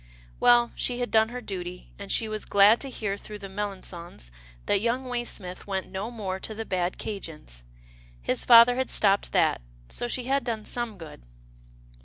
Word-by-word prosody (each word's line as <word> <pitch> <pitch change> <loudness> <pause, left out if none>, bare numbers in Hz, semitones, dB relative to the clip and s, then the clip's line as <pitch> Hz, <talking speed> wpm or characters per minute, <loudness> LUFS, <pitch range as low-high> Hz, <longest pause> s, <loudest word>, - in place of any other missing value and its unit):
Well, 240 -1 +5
she 245 -1 -1
had 245 - -2
done 220 0 +4
her 250 +1 -6
duty, 180 -4 -7
and 200 -1 -5
she 225 - +3
was 215 -1 -4
glad 205 +3 +6
to 275 - -3
hear 205 -5 -3
through 210 +1 -9
the 200 - -8
Melangons 185 - -6 0.3
that 200 - +2
young 240 +3 0
Waysmith 240 -8 -4
went 190 -2 -3
no 195 +4 -4
more 200 -5 -4
to 220 - -6
the 225 +1 -5
bad 180 -2 -1
'Cajien's. 155 - -7 0.6
His - - 0
father 240 +1 +8
had 260 -1 -1
stopped 200 -1 +2
that, - - +2 0.3
so 240 - -2
she 250 +1 -1
had 270 +2 0
done 225 -3 -3
some 240 -4 -2
good. 160 - -11
210 Hz, 180 wpm, -27 LUFS, 190-240 Hz, 0.6 s, father